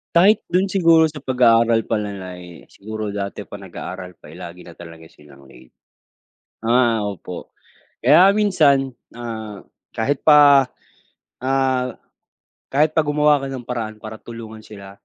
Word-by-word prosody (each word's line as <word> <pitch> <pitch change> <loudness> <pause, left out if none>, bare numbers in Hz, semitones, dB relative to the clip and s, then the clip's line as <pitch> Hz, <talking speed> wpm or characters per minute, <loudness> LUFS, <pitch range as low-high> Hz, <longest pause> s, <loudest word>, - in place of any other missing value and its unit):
Kahit 200 +5 +5
dun 185 +3 +1
siguro 165 -4 +4
sa 150 - -9
pag-aaral 115 -4 +3
pa 110 - -1
nila 100 -3 -6
lay 90 -1 -13
siguro 110 0 -6
dati 100 0 -5
pa 100 - -11
nag-aaral 90 -1 -9
pa 75 - -16
eh 85 - -12
lagi 90 0 -10
na 85 - -12
talaga 85 -1 -12
silang 70 -2 -18
late. 65 -1 -18 0.9
Ah, 115 0 +2
opo 100 -3 -7 0.5
kaya 185 +2 +7
minsan 145 -10 +3 0.3
ah, 110 -4 -7 0.3
kahit 135 +5 -1
pa 145 -3 +7 0.8
ah, 130 -2 0 0.8
kahit 150 +3 +2
pa 160 - +2
gumawa 150 0 +3
ka 135 - -5
ng 130 -3 -7
paraan 115 -3 -4
para 110 0 -8
tulungan 115 -2 -10
sila. 100 -2 -12
115 Hz, 145 wpm, -20 LUFS, 100-140 Hz, 0.9 s, kaya